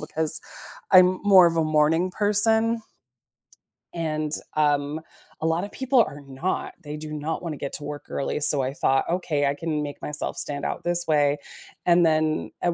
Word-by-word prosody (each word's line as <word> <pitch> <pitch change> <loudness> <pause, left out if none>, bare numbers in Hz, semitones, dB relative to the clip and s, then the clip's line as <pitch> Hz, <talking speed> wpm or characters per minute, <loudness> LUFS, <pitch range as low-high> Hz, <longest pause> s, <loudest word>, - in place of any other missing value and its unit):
because 155 +1 -2 0.5
I'm 185 0 +6
more 190 -3 +7
of 165 0 0
a 160 - +2
morning 155 +4 +2
person 220 +3 +2 1.1
and, 155 -2 -2 0.2
um, 145 0 +1 0.4
a - - -2
lotta 165 +5 0
people 265 +2 +1
are 145 -9 -3
not; 140 +7 -4
they 150 0 -6
do 155 0 -7
not 155 +3 -4
wanna 160 -3 -4
get 140 - -5
to 150 - -6
work 145 0 -7
early, 140 - -2
so 145 -1 +3
I 130 +1 -2
thought, 135 -1 +1
"Okay, 165 -5 0
I 140 - +1
can 150 0 -3
make 145 -1 -7
myself 150 0 -4
stand 145 -1 -3
out - - -3
this 175 0 0
way," 145 -2 +3 0.5
and 175 -1 +5
then, 155 -1 +1
at 175 -1 +1
155 Hz, 175 wpm, -24 LUFS, 145-175 Hz, 1.1 s, more